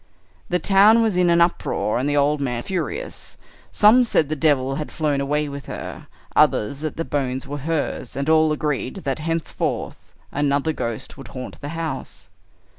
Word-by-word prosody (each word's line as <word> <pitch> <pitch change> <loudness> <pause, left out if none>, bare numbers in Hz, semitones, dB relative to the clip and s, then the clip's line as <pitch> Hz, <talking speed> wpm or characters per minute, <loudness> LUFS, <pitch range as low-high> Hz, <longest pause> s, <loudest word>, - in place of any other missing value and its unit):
"The 180 - +2
town 205 +5 +5
was 220 -4 +1
in 180 -1 +3
an 170 0 +4
uproar, 170 -9 +1
and 135 +3 0
the 145 - +1
old 145 +1 +2
man 120 -3 -2
furious. 400 - -4 0.3
Some 220 +5 +6
said 160 - +1
the 155 - -1
devil 135 -3 +1
had 155 - -5
flown 150 -3 0
away 150 +2 0
with 140 0 -7
her, - - -7 0.3
others 135 +7 +3
that 155 0 -4
the 165 - -2
bones 130 -2 -2
were 145 +1 -5
hers, 150 -5 -2
and 140 +2 -2
all 160 0 +4
agreed 150 -4 -2
that 135 +2 -2
henceforth 165 0 -3 0.2
another 145 +2 +1
ghost 115 -3 -5
would 135 - -9
haunt 125 +1 -8
the 145 - -5
house. 165 -1 -5
150 Hz, 175 wpm, -22 LUFS, 140-165 Hz, 0.3 s, Some